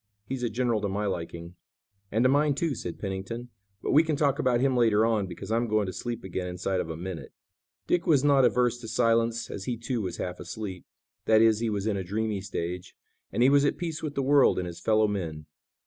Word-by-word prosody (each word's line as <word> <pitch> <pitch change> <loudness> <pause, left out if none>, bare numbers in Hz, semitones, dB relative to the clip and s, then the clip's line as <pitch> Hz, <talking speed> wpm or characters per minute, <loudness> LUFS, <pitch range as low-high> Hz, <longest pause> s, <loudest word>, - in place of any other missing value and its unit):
He's 130 +4 -4
a 120 - 0
general 120 -1 0
to 100 - -1
my 105 +2 -2
liking." 85 -2 -5 0.5
"And 110 +3 +2
to - - +6
mine, 145 +1 +3
too," 160 +1 0
said 90 -8 -6
Pennington, 100 +5 -5 0.3
"but - - -1
we 150 - +7
can 160 -2 -1
talk 140 -1 +1
about 125 -2 +2
him 135 0 +2
later 110 -3 +4
on, 110 -4 +1
because 90 - -7
I'm 115 +1 +1
going 110 -1 +1
to 95 - -5
sleep 120 -1 -5
again 95 -1 -4
inside 90 +1 -2
of 80 - -3
a 80 - -5
minute." 90 -1 -7 0.5
Dick 175 - 0
was 145 -5 +4
not 140 -2 +5
averse 125 0 +2
to 115 - -8
silence, 115 0 +1
as 95 - -6
he, 120 - -2
too, 120 0 -2
was 90 -4 -4
half 90 0 -4
asleep; 95 -5 -7 0.4
that 110 -1 +5
is, 110 -1 +4
he 115 -1 0
was 100 -2 -2
in 105 -2 0
a 95 - -3
dreamy 105 +2 -2
stage, 90 -2 -5 0.4
and 120 - +2
he 130 - +6
was 140 0 +5
at 145 - +1
peace 165 -3 -4
with 150 -2 -4
the 140 - 0
world 140 0 +5
and 90 - -1
his 85 -1 -7
fellow 110 -1 +3
men. 80 -7 -4
110 Hz, 235 wpm, -27 LUFS, 95-125 Hz, 0.5 s, we